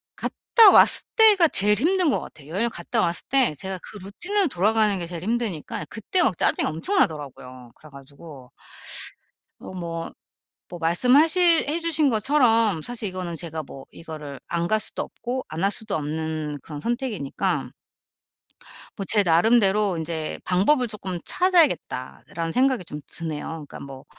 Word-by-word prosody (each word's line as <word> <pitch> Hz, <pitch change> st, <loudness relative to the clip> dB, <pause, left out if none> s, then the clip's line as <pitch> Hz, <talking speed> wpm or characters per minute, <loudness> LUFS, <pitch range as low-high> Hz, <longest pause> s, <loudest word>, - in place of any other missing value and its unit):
갔다 450 Hz, -4 st, +4 dB
왔을 -, -, +6 dB
때가 410 Hz, -7 st, +7 dB
제일 210 Hz, +1 st, +2 dB
힘든 345 Hz, -, +2 dB
것 -, -, -1 dB
같아요. 145 Hz, -2 st, -12 dB
여행을 215 Hz, +8 st, -1 dB
갔다 175 Hz, -6 st, -2 dB
왔을 170 Hz, 0 st, -1 dB
때 265 Hz, -, +3 dB
제가 190 Hz, +2 st, -5 dB
그 210 Hz, -, -10 dB
루틴으로 345 Hz, -, -2 dB
돌아가는 210 Hz, 0 st, +2 dB
게 170 Hz, -, -4 dB
제일 170 Hz, -1 st, -7 dB
힘드니까 215 Hz, -9 st, -3 dB
그때 230 Hz, -, 0 dB
막 190 Hz, -, +1 dB
짜증이 -, -, +1 dB
엄청나더라고요. 145 Hz, -, -2 dB
그래 155 Hz, -, -17 dB
가지고 140 Hz, -1 st, -14 dB, 1.1 s
어 -, -, -10 dB
뭐, 165 Hz, -2 st, -5 dB, 0.6 s
뭐 175 Hz, -, -8 dB
말씀하실 295 Hz, -, +4 dB
해주신 320 Hz, -2 st, +1 dB
것처럼 225 Hz, -, +2 dB
사실 230 Hz, +2 st, -5 dB
이거는 180 Hz, -2 st, -5 dB
제가 160 Hz, -1 st, -6 dB
뭐 135 Hz, -2 st, -12 dB
이거를 150 Hz, -4 st, -9 dB
안 170 Hz, 0 st, -1 dB
갈 215 Hz, +2 st, +1 dB
수도 -, -, -3 dB
없고 250 Hz, +3 st, -6 dB
안 160 Hz, +3 st, -4 dB
할 200 Hz, -, +2 dB
수도 210 Hz, -1 st, -3 dB
없는 155 Hz, 0 st, -4 dB
그런 150 Hz, -2 st, -8 dB
선택이니까 235 Hz, -, -2 dB, 1.3 s
뭐 195 Hz, -, -5 dB
제 210 Hz, -2 st, +2 dB
나름대로 200 Hz, +1 st, +3 dB
인제 160 Hz, -1 st, -4 dB
'방법을 240 Hz, +8 st, +2 dB
조금 190 Hz, -5 st, -6 dB
찾아야겠다.'라는 270 Hz, -, 0 dB
생각이 255 Hz, -7 st, +1 dB
좀 150 Hz, -1 st, -8 dB
드네요. 160 Hz, -1 st, -6 dB
그러니까 -, -, -11 dB
뭐 135 Hz, 0 st, -10 dB
190 Hz, 330 characters per minute, -23 LUFS, 160-245 Hz, 1.3 s, 때가